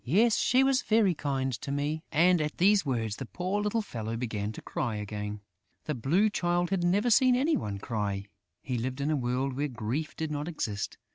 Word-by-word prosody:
"She 255 +4 +3
was 270 -1 +3
very 215 -5 +3
kind 135 -4 -2
to 140 - -4
me." 145 +3 -1
And, 175 +2 +4
at 150 0 -3
these 200 +3 +4
words, 115 -6 -2
the 135 - -6
poor 185 - -2
little 210 +2 0
fellow 115 - -4
began 110 -3 -3
to - - -9
cry 120 -6 -2
again. 105 0 -5 0.4
The 150 - -1
Blue 150 - +2
Child 175 -3 0
had 190 -3 +1
never 200 +7 +2
seen 255 +3 +5
any 290 +6 +2
one 100 -2 -3
cry. 100 -2 -3 0.4
He 125 -3 -2
lived 130 +3 -3
in 145 +3 0
a - - +2
world 130 +1 -1
where 145 +2 0
grief 125 +5 -3
did 160 -1 -3
not 150 +1 -3
exist. 110 -12 -3
145 Hz, 200 wpm, -29 LUFS, 115-180 Hz, 0.4 s, seen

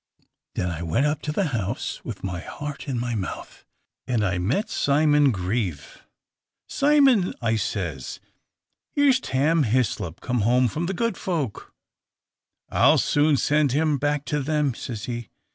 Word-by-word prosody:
Then 90 - -1
I 80 -1 -5
went 85 - +1
up 150 0 0
to 150 - -3
the 175 +1 0
house, 115 -2 -3
with 115 -5 -7
my 90 -3 -3
heart 145 - -7
in 130 -4 -2
my 120 0 -2
mouth, 100 -5 -5 0.4
and 115 -4 +1
I 90 -2 0
met 125 - 0
Simon 145 0 +3
Grieve. 95 - -3 0.7
'Simon,' 275 -9 +3
I 115 -2 +1
says, 85 - -3 0.8
'here's 280 -3 +4
Tam 155 - +1
Hislop 110 - 0
come 125 -1 -1
home 125 +4 +3
from 165 +9 -3
the 195 - -2
good 230 +4 -1
folk.' 155 - -3 1.0
'I - - +4
'll - - +3
soon 145 0 +3
send 145 -1 +2
him 150 -1 +2
back 145 +1 0
to 150 -1 -1
them,' 150 -1 0
says 115 -2 -6
he. 120 -4 -5
135 Hz, 155 wpm, -24 LUFS, 105-150 Hz, 1.0 s, here's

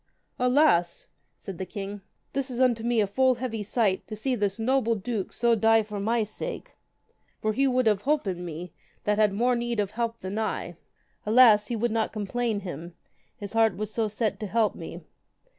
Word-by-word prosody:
Alas, 250 - +3 0.3
said 190 -4 -8
the - - -2
king, 200 +1 -6 0.3
this 275 -1 -1
is 245 -1 -5
unto 245 -3 +3
me 235 -1 +2
a - - +3
full 255 +6 +2
heavy 235 -3 -4
sight 205 -2 0
to 215 - -6
see 255 +5 -1
this 205 -4 -1
noble 230 0 +1
duke 210 -1 -3
so 235 -1 +2
die 225 0 +4
for 210 -1 -6
my 225 +3 +1
sake, 210 - -6 0.7
for 215 0 0
he 275 +5 +2
would 255 -1 +2
have 210 -3 +3
holpen 210 - -1
me 175 +1 -7 0.3
that 210 0 +1
had 210 -1 +4
more 245 +5 +2
need 235 -1 -2
of 205 -1 0
help 230 +1 -2
than 190 +3 -4
I. 220 - -3 0.5
Alas, 215 -2 +6
he 240 - -2
would 235 +1 0
not 225 0 0
complain 220 +1 -2
him, 170 -2 -7 0.4
his 205 0 -7
heart 225 -4 +3
was 215 +1 -4
so 225 -2 0
set 215 +1 -2
to 215 - -4
help 220 +1 +1
me. - - -8
220 Hz, 195 wpm, -27 LUFS, 205-240 Hz, 0.7 s, Alas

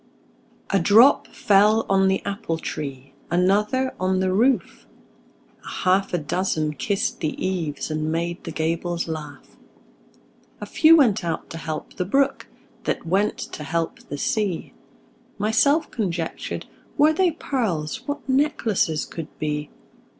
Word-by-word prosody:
A 195 - +3
drop 220 +10 +6
fell 210 +2 +3
on 195 0 +3
the 190 0 0
apple 195 -5 -3
tree, 140 -4 -6 0.2
Another 210 +9 +2
on 185 0 +1
the 185 0 +1
roof; 240 +6 +1 0.8
A - - -12 0.2
half 190 +1 +2
a 175 - +1
dozen 155 -1 -1
kissed 220 +8 -1
the 155 -4 -2
eaves, 165 -6 -2
And 155 0 -1
made 170 +2 -2
the - - -6
gables 170 +2 -2
laugh. 150 -3 -8 1.0
A - - -5
few 325 +1 +6
went 220 - +3
out 165 -2 -4
to 165 - -6
help 155 -1 -5
the 180 - -1
brook, 275 +8 +1 0.4
That - - -2
went 195 +5 +1 0.2
to 150 - -6
help 165 +2 -2
the 145 - -4
sea. 200 +2 -1 0.6
Myself 280 +9 +2
conjectured, 175 -7 -3 0.3
Were 305 +2 +5
they 365 +2 +3
pearls, 220 - -3
What 285 -1 -4
necklaces 235 - +1
could 165 -2 -7
be! 150 -1 -3
185 Hz, 135 wpm, -23 LUFS, 160-220 Hz, 1.0 s, drop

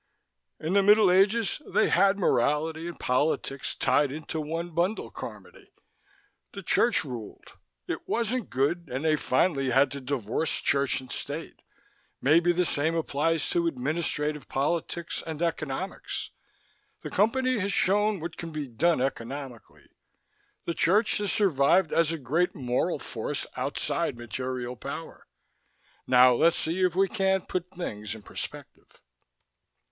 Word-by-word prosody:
"In 160 +4 -2
the 200 - +5
middle 205 -1 +6
ages, 200 +8 +3
they - - +2
had 195 +2 +4
morality 160 0 +1
and 175 - -8
politics 135 0 0
tied 145 -2 +2
into 155 +2 -4
one 165 +3 -4
bundle, 175 +6 -1
Carmody. - - -10 0.8
The 200 - -7
church 235 +6 +2
ruled. 120 -7 -9 0.3
It - - -5
wasn't 235 0 -1
good 160 +7 0
and 130 +5 -3
they 155 -1 +4
finally 135 -1 +1
had 135 +3 +4
to 140 - -6
divorce 130 +2 -1
church 140 -1 +1
and 130 - -12
state. 150 +4 -5 0.6
Maybe 165 +5 +4
the 180 +1 +1
same 160 0 0
applies 165 0 0
to 170 -1 +1
administrative 150 0 -2
politics 165 +4 -2
and 160 -2 -5
economics. 165 +1 -3 0.7
The - - -6
Company 255 +4 +2
has 200 +1 -1
shown 205 +1 +2
what 165 +1 -6
can 170 - -6
be 155 -2 -4
done 155 +5 +1
economically. 130 -2 -5 0.8
The 170 - -1
church 210 +7 +2
has 205 -1 -1
survived 165 -2 +3
as 165 -1 +3
a 165 - -2
great 155 +6 0
moral 125 -2 0
force - - -4
outside - - -2
material 125 +1 -4
power. 140 +6 -8 0.8
Now 125 0 +7
let's 165 +7 +3
see 170 +4 -1
if 180 -2 +2
we 195 +1 +3
can't 190 -2 0
put 180 0 -3
things 115 - -5
in 110 - -12
perspective. - - -8
160 Hz, 140 wpm, -27 LUFS, 135-185 Hz, 0.8 s, Now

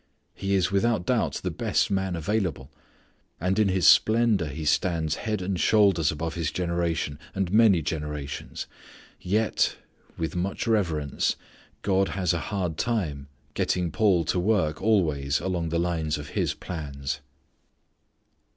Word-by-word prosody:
He 100 0 -1
is 95 -1 +1
without 100 -1 +1
doubt - - +1
the - - -1
best - - 0
man 95 -2 0
available. 85 -6 -2 0.7
And 95 +4 0
in 105 - +4
his 95 -3 +1
splendour 110 -6 +5
he 75 +2 -5
stands 80 0 +1
head 105 -4 -1
and 90 -1 -2
shoulders 95 -8 +4
above 80 +1 -4
his 85 -4 -1
generation 85 -4 -2 0.2
and 95 -1 -1
many 105 -7 +5
generations. 75 -2 -4 0.5
Yet 105 +3 +1 0.4
(with 80 +2 -3
much 90 +3 -2
reverence) 85 -10 0 0.5
God 95 -1 +2
has 90 -3 +1
a 85 - -1
hard 90 -6 -2
time 80 -13 -1 0.3
getting 90 +1 0
Paul 95 -3 +3
to 90 - 0
work 90 -6 +1
always 75 -10 +2
along 90 -3 -2
the 85 - 0
line 85 -2 -1
of 75 0 -8
His - - -1
plans. 70 -5 -5
90 Hz, 140 wpm, -26 LUFS, 80-100 Hz, 0.7 s, splendour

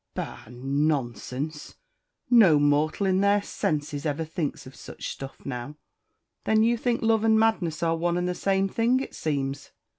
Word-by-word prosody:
Bah - - -6
nonsense 135 +1 -2 0.5
no 210 -11 +6
mortal 145 +6 +2
in 190 0 +2
their 200 +1 +4
senses 145 -4 -2
ever 155 +1 -2
thinks 160 -1 -4
of 130 - -12
such - - -8
stuff 135 0 -9
now." 130 +2 -5 0.7
"Then 220 0 +3
you 235 +1 +3
think 235 0 -1
love 225 -1 +3
and 220 -1 +4
madness 185 -9 +1
are 165 0 +2
one 170 +1 0
and 180 0 -1
the 180 - -1
same 195 +1 +1
thing, 230 +5 +1
it 270 - -6
seems?" 140 -3 -3
160 Hz, 160 wpm, -26 LUFS, 145-205 Hz, 0.7 s, no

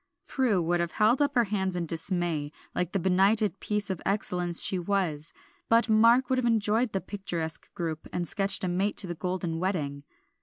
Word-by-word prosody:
Prue 230 -10 +1
would 175 +1 0
have 170 0 -2
held 225 +6 +3
up 285 -1 +1
her 240 - +4
hands 190 -3 -2
in 175 -1 -2
dismay, 165 -2 -2 0.2
like 180 -1 -2
the - - 0
benighted 195 +2 +3
piece 210 -2 -2
of 185 - -5
excellence 180 -3 0
she 190 - +1
was, 175 -5 -2 0.4
but 230 +1 +3
Mark 230 +4 +5
would 260 0 +1
have 250 - -1
enjoyed 225 +1 +1
the 195 - -1
picturesque 170 -4 -5
group 160 -2 -4
and 175 -1 -3
sketched 195 +3 +1
a - - 0
mate 190 +4 -1
to - - +4
the 175 - -4
Golden 175 -1 -3
Wedding. 155 -7 -2
190 Hz, 190 wpm, -27 LUFS, 175-210 Hz, 0.4 s, Mark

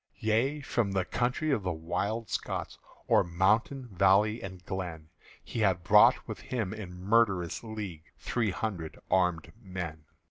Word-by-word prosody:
Yea, 120 +7 +1
from 115 -7 -1
the 95 -2 +1
country 125 +9 0
of 135 - +1
the 90 -1 -1
Wild 100 +7 -2
Scots, - - -4 0.3
O'er - - +5
mountain, 105 +9 +1
valley, 100 +4 +3
and 95 -2 -8
glen, 85 -5 -5 0.3
He - - -5
had 95 -5 +2
brought 85 - +6
with - - -6
him 110 -6 -3
in 105 -5 -7
murderous 95 -2 +1
league 105 -8 -6
Three 115 -3 -1
hundred 90 -5 -4
armèd 90 -3 +2
men. 85 -6 -6
95 Hz, 145 wpm, -30 LUFS, 90-110 Hz, 0.3 s, brought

